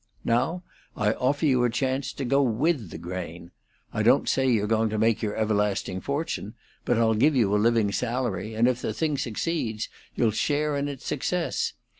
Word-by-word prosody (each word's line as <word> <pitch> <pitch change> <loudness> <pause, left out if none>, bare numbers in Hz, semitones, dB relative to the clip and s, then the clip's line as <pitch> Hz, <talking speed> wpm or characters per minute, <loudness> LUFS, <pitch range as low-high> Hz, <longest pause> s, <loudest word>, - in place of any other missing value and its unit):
Now, 165 +10 +1 0.3
I 110 -4 +2
offer 140 +6 0
you 130 -4 +3
a 120 - +3
chance 130 +3 -1
to 135 - -4
go 140 +3 +3
with 130 - +1
the - - -7
grain. 85 -1 -7 0.4
I - - 0
don't - - +4
say 135 -1 +2
you're 110 -4 +2
going 110 +1 +1
to 110 - -2
make 110 +1 +2
your 105 -2 -2
everlasting 105 -3 0
fortune, 140 - -3 0.3
but 120 - +2
I'll 115 -1 +3
give 140 +7 +3
you 110 -6 +3
a 105 - +3
living 115 -2 +3
salary, 115 -3 -2
and 115 +2 +3
if 125 -1 0
the 110 - -2
thing 150 +1 0
succeeds 115 -2 -2 0.3
you'll 115 -2 +2
share 150 +6 0
in 140 0 -1
its 140 -2 -7
success. 175 +4 -1
115 Hz, 190 wpm, -26 LUFS, 105-140 Hz, 0.4 s, don't